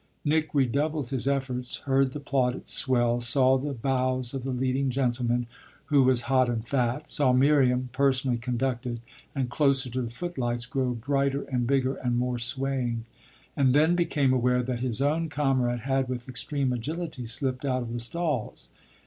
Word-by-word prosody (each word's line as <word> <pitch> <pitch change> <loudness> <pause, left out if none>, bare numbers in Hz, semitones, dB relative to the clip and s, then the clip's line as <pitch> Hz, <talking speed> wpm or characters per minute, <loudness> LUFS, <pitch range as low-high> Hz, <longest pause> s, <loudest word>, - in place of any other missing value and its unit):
Nick 155 +1 +1
redoubled 140 +1 0
his 130 -1 -1
efforts; 130 -3 -1
heard 135 -1 +2
the 150 - -6
plaudits 130 -3 -1
swell; 120 -2 +3
saw 130 +2 +4
the 140 +2 -2
bows 130 0 -1
of 135 - -3
the 135 - -5
leading 130 +1 0
gentleman, 120 -2 0 0.5
who 140 - +6
was 130 -2 +4
hot 130 -1 +2
and 115 -1 -3
fat; 130 +3 -1
saw 140 -4 +3
Miriam, 130 -1 +3
personally 130 -1 +1
conducted 125 0 -2 0.4
and 130 -3 -2
closer 135 -3 +2
to 130 +2 -2
the 120 - -4
footlights, 120 -4 -3
grow 130 -1 -1
brighter 140 +3 0
and 125 -3 -2
bigger 135 0 +1
and 120 -1 -1
more 125 0 -1
swaying; 125 -2 -2 0.5
and 135 -2 +3
then 160 +4 +4
became 145 -6 +1
aware 125 0 +2
that 125 -1 -3
his 125 +1 -1
own 160 +3 0
comrade 130 -5 0
had 135 +1 0
with 125 -1 -4
extreme 130 +1 -1
agility 150 +1 -4
slipped 130 +2 0
out 130 -2 0
of 115 -1 -6
the 120 - -3
stalls. 145 0 -3
130 Hz, 165 wpm, -27 LUFS, 125-140 Hz, 0.5 s, who